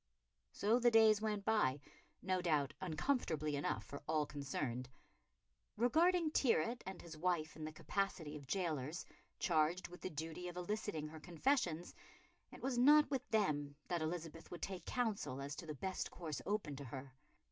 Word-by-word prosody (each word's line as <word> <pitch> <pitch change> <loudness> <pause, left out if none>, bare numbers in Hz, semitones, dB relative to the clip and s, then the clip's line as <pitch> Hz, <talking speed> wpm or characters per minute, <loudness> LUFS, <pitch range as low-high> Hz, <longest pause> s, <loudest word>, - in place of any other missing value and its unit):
So 220 +4 +3
the 240 0 +6
days 220 -2 +6
went 210 -2 -1
by, 180 -12 +3 0.4
no 185 -1 +1
doubt 150 -5 +2
uncomfortably 160 - 0
enough 145 - -1
for 140 - -7
all 155 -1 +2
concerned. 135 -4 -3 0.9
Regarding 320 - +4
Tyrwhitt 235 - +2
and 190 -1 -5
his 165 -2 -9
wife 160 -1 0
in 155 - -7
the 155 - -4
capacity 165 -2 -2
of 145 -3 -9
gaolers, 160 -3 -1 0.3
charged 170 +1 +2
with 180 - -11
the - - -3
duty 160 +3 -5
of 175 0 -6
eliciting 180 -4 -2
her 160 0 -9
confessions, 175 - 0 0.6
it - - -11
was 255 -2 +1
not 295 +3 +7
with 270 -3 -1
them 150 -10 +1
that 175 -2 0
Elizabeth 165 0 -4
would 175 - -7
take 190 -2 -4
counsel 205 - -1
as 140 +2 -4
to 165 - -7
the 155 - -4
best 190 +6 -2
course 160 -4 -5
open 200 -8 -1
to 140 - -6
her. 130 +1 -7
175 Hz, 165 wpm, -39 LUFS, 150-210 Hz, 0.9 s, not